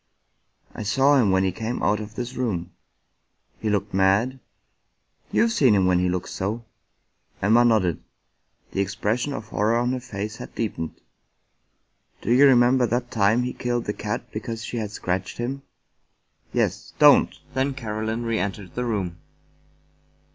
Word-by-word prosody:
" -, -, -37 dB
I -, -, -7 dB
saw 135 Hz, +7 st, +3 dB
him 105 Hz, -, +2 dB
when 95 Hz, 0 st, +3 dB
he 95 Hz, -, +1 dB
came 115 Hz, +5 st, -4 dB
out 105 Hz, +1 st, +2 dB
of 105 Hz, 0 st, -8 dB
this 125 Hz, +1 st, -4 dB
room." 95 Hz, -9 st, -2 dB, 0.9 s
"He 110 Hz, -, -2 dB
looked 105 Hz, -1 st, -1 dB
mad?" 100 Hz, +8 st, +2 dB, 0.5 s
" -, -, -40 dB
You've 230 Hz, -, +3 dB
seen 135 Hz, -, +4 dB
him 95 Hz, -2 st, +3 dB
when 90 Hz, -1 st, +3 dB
he 90 Hz, 0 st, +1 dB
looked 90 Hz, 0 st, -2 dB
so." 110 Hz, +5 st, -3 dB, 0.7 s
Emma 110 Hz, +5 st, +4 dB
nodded; 105 Hz, -8 st, +2 dB, 0.7 s
the 100 Hz, -, 0 dB
expression 105 Hz, +7 st, -1 dB
of 115 Hz, -6 st, -6 dB
horror 110 Hz, +3 st, +1 dB
on 120 Hz, +1 st, +1 dB
her 130 Hz, -, -1 dB
face 105 Hz, -2 st, -6 dB
had -, -, -10 dB
deepened. 80 Hz, -8 st, -4 dB, 0.6 s
" -, -, -43 dB
Do 115 Hz, -, -1 dB
you 140 Hz, +3 st, +7 dB
remember 125 Hz, -1 st, +5 dB
that 120 Hz, +2 st, -2 dB
time 110 Hz, +3 st, +3 dB
he 125 Hz, -, -3 dB
killed 120 Hz, -1 st, -2 dB
the 105 Hz, -, -2 dB
cat 105 Hz, 0 st, -4 dB
because 115 Hz, +1 st, -5 dB
she 120 Hz, -, -5 dB
had 110 Hz, -2 st, -2 dB
scratched 95 Hz, -1 st, -3 dB
him?" 130 Hz, +3 st, -3 dB, 0.9 s
"Yes. -, -, -1 dB
Don't!" -, -, +6 dB, 0.2 s
Then 135 Hz, 0 st, 0 dB
Caroline 110 Hz, -1 st, -3 dB
reentered 100 Hz, -4 st, -3 dB
the 125 Hz, -, -2 dB
room. 95 Hz, -7 st, -2 dB
110 Hz, 160 wpm, -24 LUFS, 100-120 Hz, 0.9 s, you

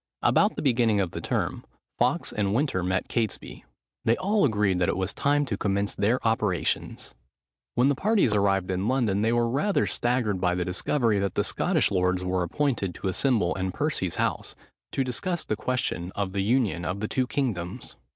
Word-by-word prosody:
About -, -, +3 dB
the -, -, -4 dB
beginning 120 Hz, -6 st, +3 dB
of 95 Hz, -4 st, 0 dB
the -, -, -5 dB
term, -, -, -2 dB, 0.4 s
Fawkes -, -, +1 dB
and 100 Hz, -1 st, 0 dB
Winter 135 Hz, -8 st, +1 dB
met 90 Hz, +1 st, -1 dB
Catesby. 115 Hz, -4 st, -3 dB, 0.4 s
They 115 Hz, +1 st, +2 dB
all 200 Hz, +2 st, +1 dB
agreed 105 Hz, -6 st, +1 dB
that 90 Hz, -, +2 dB
it -, -, -1 dB
was 95 Hz, 0 st, -1 dB
time 145 Hz, +1 st, +1 dB
to 110 Hz, -7 st, -3 dB
commence 100 Hz, 0 st, 0 dB
their 115 Hz, +5 st, +1 dB
operations. 105 Hz, -6 st, -1 dB, 0.6 s
When 125 Hz, +2 st, +4 dB
the 145 Hz, -, +4 dB
parties 195 Hz, -, +2 dB
arrived 95 Hz, -2 st, +1 dB
in 95 Hz, +2 st, -1 dB
London, 115 Hz, -6 st, +1 dB
they 110 Hz, +1 st, +2 dB
were 120 Hz, 0 st, +2 dB
rather 150 Hz, -, +1 dB
staggered 120 Hz, -6 st, 0 dB
by 90 Hz, 0 st, +2 dB
the 90 Hz, -1 st, -1 dB
discovery, 110 Hz, +4 st, +1 dB
that 100 Hz, -2 st, -2 dB
the -, -, +2 dB
Scottish -, -, +1 dB
lords 90 Hz, -1 st, +1 dB
were 90 Hz, 0 st, 0 dB
appointed 100 Hz, -, -1 dB
to 95 Hz, -, -3 dB
assemble 105 Hz, -2 st, +1 dB
in 95 Hz, 0 st, -2 dB
Percy's 145 Hz, -, -1 dB
house, -, -, -2 dB, 0.4 s
to 135 Hz, -, 0 dB
discuss 170 Hz, +8 st, -2 dB
the 110 Hz, -, -1 dB
question 105 Hz, -7 st, -2 dB
of 100 Hz, -2 st, -2 dB
the 100 Hz, -, 0 dB
union 105 Hz, -4 st, +1 dB
of 90 Hz, +3 st, -3 dB
the 110 Hz, -, -2 dB
two 130 Hz, +2 st, 0 dB
kingdoms. 105 Hz, -12 st, -3 dB
105 Hz, 190 wpm, -26 LUFS, 95-125 Hz, 0.6 s, When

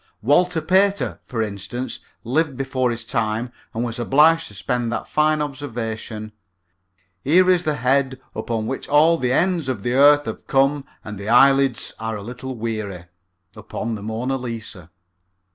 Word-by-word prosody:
Walter 165 Hz, +6 st, +3 dB
Pater, 195 Hz, +4 st, +2 dB
for 115 Hz, -4 st, -1 dB
instance, 110 Hz, +5 st, -5 dB, 0.2 s
lived 140 Hz, +3 st, 0 dB
before 130 Hz, -2 st, 0 dB
his 115 Hz, -1 st, -3 dB
time 115 Hz, +1 st, -2 dB, 0.2 s
and 115 Hz, -, -3 dB
was 120 Hz, 0 st, -4 dB
obliged 155 Hz, +7 st, +4 dB
to 105 Hz, -, -13 dB
spend 120 Hz, +2 st, -2 dB
that -, -, -3 dB
fine 155 Hz, 0 st, +2 dB
observation, 115 Hz, -6 st, -5 dB, 0.9 s
"Here 180 Hz, +6 st, +5 dB
is 180 Hz, -1 st, +1 dB
the 155 Hz, -1 st, +1 dB
head 130 Hz, 0 st, +1 dB
upon 115 Hz, -3 st, -3 dB
which 130 Hz, +4 st, -4 dB
all 160 Hz, +3 st, +5 dB
the 125 Hz, -1 st, 0 dB
ends 170 Hz, -1 st, +1 dB
of 115 Hz, -7 st, -3 dB
the 120 Hz, -, -1 dB
earth 145 Hz, +2 st, +6 dB
have -, -, -7 dB
come 135 Hz, +1 st, +2 dB, 0.2 s
and 105 Hz, -2 st, -7 dB
the 100 Hz, +2 st, -5 dB
eyelids 135 Hz, 0 st, +4 dB
are 110 Hz, 0 st, -3 dB
a 100 Hz, -, -7 dB
little 125 Hz, +3 st, -7 dB
weary" 110 Hz, -6 st, -4 dB, 0.5 s
upon 110 Hz, +1 st, -5 dB
the 105 Hz, -, -5 dB
Mona 115 Hz, +5 st, -2 dB
Lisa. 115 Hz, -8 st, -7 dB
125 Hz, 160 wpm, -22 LUFS, 115-145 Hz, 0.9 s, earth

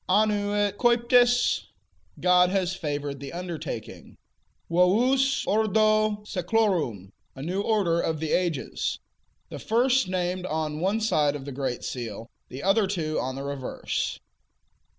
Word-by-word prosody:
Annuit 205 Hz, 0 st, +2 dB
captis: 245 Hz, 0 st, +3 dB, 0.5 s
God 180 Hz, 0 st, +4 dB
has 185 Hz, -1 st, 0 dB
favored 145 Hz, -6 st, -4 dB
the 140 Hz, 0 st, -7 dB
undertaking; 165 Hz, -9 st, -7 dB, 0.5 s
Vovus 245 Hz, +11 st, +3 dB
ordo 215 Hz, 0 st, +2 dB
seclorum: 175 Hz, -, 0 dB, 0.2 s
A 135 Hz, -, -7 dB
new 185 Hz, +5 st, -1 dB
order 195 Hz, -6 st, +1 dB
of 160 Hz, -1 st, -2 dB
ages. 160 Hz, -4 st, -1 dB, 0.5 s
The -, -, -7 dB
first 245 Hz, +1 st, +2 dB
named 185 Hz, 0 st, -2 dB
on 155 Hz, -1 st, -2 dB
one 195 Hz, +6 st, 0 dB
side 150 Hz, -9 st, +2 dB
of 135 Hz, -2 st, -7 dB
the 140 Hz, -, -6 dB
great 130 Hz, -2 st, -3 dB
seal, 115 Hz, -2 st, -6 dB, 0.2 s
the 130 Hz, +3 st, -8 dB
other 195 Hz, +2 st, +3 dB
two 160 Hz, -5 st, -2 dB
on 130 Hz, +1 st, -3 dB
the 135 Hz, -, -5 dB
reverse. 140 Hz, -2 st, -3 dB
180 Hz, 125 wpm, -26 LUFS, 150-215 Hz, 0.5 s, God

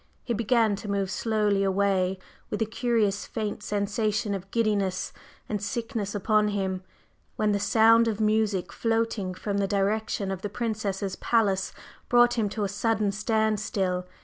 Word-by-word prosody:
He 240 Hz, -, -2 dB
began 225 Hz, -1 st, +2 dB
to 205 Hz, -, -7 dB
move 200 Hz, -1 st, -1 dB
slowly 210 Hz, -2 st, +1 dB
away 190 Hz, -1 st, +1 dB, 0.3 s
with -, -, -3 dB
a 225 Hz, -, +2 dB
curious 220 Hz, -3 st, 0 dB
faint 215 Hz, -2 st, -3 dB
sensation 210 Hz, +1 st, -1 dB
of 195 Hz, 0 st, -5 dB
giddiness 200 Hz, -4 st, 0 dB, 0.3 s
and 210 Hz, -2 st, -2 dB
sickness 225 Hz, -1 st, -3 dB
upon 210 Hz, +1 st, +2 dB
him, 190 Hz, -2 st, -1 dB, 0.5 s
when 215 Hz, -1 st, +1 dB
the 200 Hz, -, +1 dB
sound 230 Hz, +2 st, +5 dB
of 220 Hz, -2 st, -1 dB
music 215 Hz, -4 st, +1 dB
floating 225 Hz, -5 st, -1 dB
from 200 Hz, +2 st, -2 dB
the 200 Hz, -, +1 dB
direction 200 Hz, 0 st, 0 dB
of 190 Hz, -1 st, -4 dB
the 205 Hz, -, -3 dB
Princess 215 Hz, -3 st, -2 dB
Ziska's 195 Hz, -2 st, -3 dB
palace 200 Hz, -5 st, +1 dB, 0.4 s
brought 240 Hz, 0 st, +5 dB
him 220 Hz, -3 st, 0 dB
to 210 Hz, +1 st, -3 dB
a -, -, +1 dB
sudden 205 Hz, +1 st, 0 dB
standstill. 210 Hz, -3 st, 0 dB
210 Hz, 155 wpm, -27 LUFS, 195-220 Hz, 0.5 s, sound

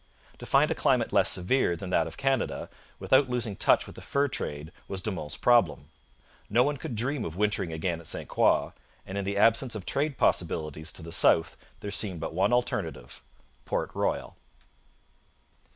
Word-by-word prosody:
To -, -, -9 dB
find -, -, +3 dB
a -, -, +3 dB
climate -, -, +1 dB
less -, -, +5 dB
severe 90 Hz, 0 st, +2 dB
than 90 Hz, +2 st, -7 dB
that 80 Hz, -2 st, +2 dB
of 80 Hz, -, -9 dB
Canada, 135 Hz, -1 st, -1 dB, 0.3 s
without 130 Hz, 0 st, +3 dB
losing 120 Hz, -5 st, -2 dB
touch -, -, +3 dB
with -, -, -12 dB
the -, -, -10 dB
fur 140 Hz, +1 st, 0 dB
trade, 75 Hz, -, -5 dB, 0.2 s
was 95 Hz, -, -3 dB
De 105 Hz, +3 st, -2 dB
Monts' 75 Hz, -5 st, -4 dB
problem. 80 Hz, -, +2 dB, 0.6 s
No 120 Hz, +4 st, +4 dB
one 145 Hz, +1 st, -1 dB
could 125 Hz, -, -6 dB
dream 125 Hz, +3 st, -1 dB
of 80 Hz, -, -5 dB
wintering 100 Hz, -4 st, 0 dB
again 80 Hz, +1 st, -2 dB
at 85 Hz, -, -9 dB
St -, -, -3 dB
Croix, -, -, +2 dB, 0.3 s
and 95 Hz, -, -7 dB
in 100 Hz, -1 st, -2 dB
the 100 Hz, +1 st, -2 dB
absence 115 Hz, +3 st, +3 dB
of 100 Hz, -4 st, -6 dB
trade 145 Hz, 0 st, 0 dB
possibilities 80 Hz, -1 st, 0 dB
to 85 Hz, -, -5 dB
the 85 Hz, -, -9 dB
south 80 Hz, -1 st, +4 dB, 0.3 s
there 100 Hz, -, -5 dB
seemed 95 Hz, -4 st, -2 dB
but 80 Hz, -, -5 dB
one 95 Hz, +7 st, +1 dB
alternative 120 Hz, -, -2 dB, 0.4 s
Port -, -, -2 dB
Royal. -, -, -2 dB
100 Hz, 185 wpm, -27 LUFS, 80-120 Hz, 0.6 s, less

